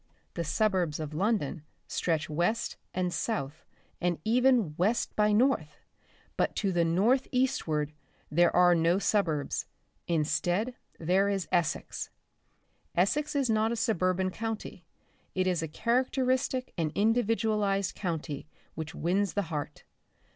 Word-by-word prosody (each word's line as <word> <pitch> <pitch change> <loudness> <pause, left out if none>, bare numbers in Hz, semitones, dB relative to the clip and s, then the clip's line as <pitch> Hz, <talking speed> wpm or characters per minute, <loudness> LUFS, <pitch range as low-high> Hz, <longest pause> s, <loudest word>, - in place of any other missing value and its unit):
The 170 - -2
suburbs 180 -2 +1
of 155 -1 -5
London 180 -4 0 0.2
stretch 160 -3 -1
west 175 +9 0 0.2
and 180 -1 -1
south 160 - -3 0.4
and 175 -1 +1
even 240 -6 +3
west 205 +8 0
by 210 0 +3
north, 210 - +2 0.6
but - - +1
to 200 -3 0
the 175 -2 +2
north 210 +11 +2
eastward 160 - 0 0.4
there 175 +3 +5
are 180 0 +6
no 170 +1 +3
suburbs; 175 -8 0 0.4
instead 175 +7 0 0.2
there 185 +4 +2
is 195 -3 -1
Essex. 175 -3 -1 0.9
Essex 290 - +1
is 275 -2 +2
not 220 0 +2
a - - 0
suburban 185 -5 +1
county; 220 -3 -5 0.5
it 185 0 +1
is 180 -3 +1
a 160 - -2
characteristic 255 - 0
and 155 -2 0
individualised 215 -3 +1
county 160 -6 -4 0.3
which 160 -1 -6
wins 190 +4 0
the 205 -5 -1
heart. 145 -1 -4
185 Hz, 125 wpm, -29 LUFS, 165-225 Hz, 0.9 s, are